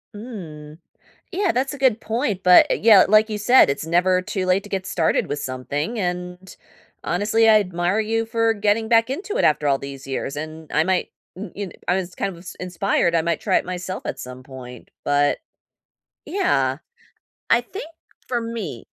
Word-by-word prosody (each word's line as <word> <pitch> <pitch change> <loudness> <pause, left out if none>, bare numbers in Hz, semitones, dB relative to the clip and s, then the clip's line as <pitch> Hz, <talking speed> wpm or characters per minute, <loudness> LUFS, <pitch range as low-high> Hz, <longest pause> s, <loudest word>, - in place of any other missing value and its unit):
Mm. 160 -10 -9 0.5
Yeah, 385 0 +1
that's 265 +2 -1
a 285 - -7
good 255 -4 +2
point, 220 -4 -2
but, 180 0 +7 0.2
yeah, 210 -5 +8
like 215 +2 +5
you 215 - -3
said, 245 - +6
it's 140 +3 -2
never 180 +2 +2
too 185 +1 -3
late 185 +2 +2
to 205 - -12
get 190 -2 -3
started 165 -4 +1
with 145 - -3
something, 145 - -4
and 180 0 -4 0.5
honestly, 215 +5 +2
I 215 -1 +7
admire 180 +1 -1
you 225 +1 0
for 225 0 +1
getting 215 +1 +1
back 230 +1 +3
into 405 - -3
it - - +1
after 150 - +2
all 140 -1 +3
these 140 -1 -8
years, 135 +1 -4
and 155 +1 -7
I 160 - +3
might, 185 0 0 0.2
y 190 0 -7
you 200 0 -4
know, 175 - -12
I 180 - +2
was 185 -1 -3
kind - - -2
of 180 - -10
ins 180 +1 -10
inspired, 180 -1 0
I 165 - +2
might 170 -1 -1
try - - +2
it - - -2
myself 185 +1 -5
at - - -4
some 125 0 -9
point, 125 -2 -11
but 145 0 +2 0.9
yeah, 135 - +1 0.7
I 230 - +5
think 305 - -8 0.4
for 240 -2 -1
me 230 - -5
185 Hz, 190 wpm, -22 LUFS, 160-225 Hz, 0.9 s, yeah